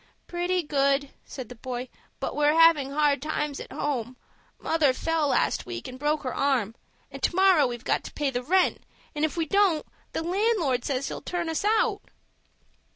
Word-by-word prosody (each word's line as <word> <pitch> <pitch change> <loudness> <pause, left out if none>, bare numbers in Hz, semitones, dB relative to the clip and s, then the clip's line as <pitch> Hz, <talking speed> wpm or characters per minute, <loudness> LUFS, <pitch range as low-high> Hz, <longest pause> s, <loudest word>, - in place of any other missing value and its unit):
"Pretty 355 +1 -1
good," 280 -1 +1
said 260 -4 -8
the 245 - -9
boy; 250 +1 -5 0.3
"but - - -3
we're 295 +2 +3
havin' 325 -5 +6
hard 285 -1 +2
times 300 -1 -2
at - - -9
home. 255 -4 -3 0.4
Mother 310 -5 +2
fell 325 +2 0
last 275 - +1
week 115 -1 -6
and 255 0 -9
broke 295 +1 0
her 255 -2 -3
arm, 255 -7 +1 0.4
and - - -9
to - - 0
morrow 375 -7 +5
we've 240 0 -6
got - - +1
to - - -8
pay 290 -2 -1
the 245 -1 -2
rent, 365 +8 +2 0.3
and 295 - -3
if 315 +2 0
we 330 - +1
don't 380 -2 +2 0.3
the - - -2
landlord 350 - +1
says 275 -1 -1
he'll - - -6
turn 345 -2 -3
us 320 - -2
out." 435 0 +2
295 Hz, 185 wpm, -26 LUFS, 265-335 Hz, 0.4 s, havin